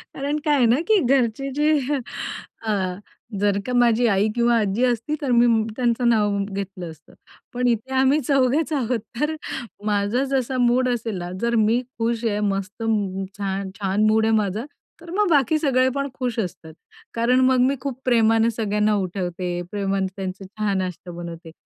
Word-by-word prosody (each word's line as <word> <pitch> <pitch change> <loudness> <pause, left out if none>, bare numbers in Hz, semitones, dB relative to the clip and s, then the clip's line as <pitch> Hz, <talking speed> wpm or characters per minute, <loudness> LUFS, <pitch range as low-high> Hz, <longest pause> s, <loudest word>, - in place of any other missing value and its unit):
कारण 285 +2 -2
काय 295 - +3
आहे 255 -4 +4
ना 240 +5 +3
की 435 -3 +5
घरचे 265 -1 +1
जे 300 0 +3 0.8
अ, 220 - -1 0.7
जर 205 -1 +2
का 250 - -3
माझी 240 -1 +4
आई 200 0 +2
किंवा 235 0 +3
आजी 210 +3 0
असती, 245 +5 -1
तर 270 -3 -1
मी 240 0 +5 0.3
त्यांचं 240 -1 +1
नाव 210 -3 +2
घेतलं 195 -3 -5
असतं. 155 -1 -18 0.4
पण 250 0 0
इथे 240 +3 -1
आम्ही 265 +3 +4
चौघेच 275 +4 +1
आहोत 245 -4 0 0.2
तर 310 +1 0 0.5
माझा 210 +5 +1
जसा 260 -1 0
मूड 250 +1 +3
असेल 230 -4 -2
ना 175 0 -5
जर 235 0 +1
मी 235 +3 +2 0.2
खुश 230 0 -1
आहे, 210 -2 0
मस्त 200 +1 -2 0.5
छान, 195 -1 -3
छान 200 +1 +1
मूड 220 0 +3
आहे 225 - +2
माझा, 210 +3 -1 0.4
तर 340 - -12
मग 415 -3 +3
बाकी 295 0 +3
सगळे 260 -3 +2
पण 280 0 -1
खुश 250 -3 -3
असतात. 170 -5 -5 0.4
कारण 235 +2 +2
मग 260 -1 +3
मी 275 - +1
खूप 265 -3 -4
प्रेमाने 225 -2 +4
सगळ्यांना 210 -1 +1
उठवते, 180 -2 -3 0.2
प्रेमाने 195 -1 -1
त्यांचे 190 0 -5
चहा-नाश्ता 190 -3 -3
बनवते. 170 -1 -8
230 Hz, 165 wpm, -23 LUFS, 200-255 Hz, 0.8 s, की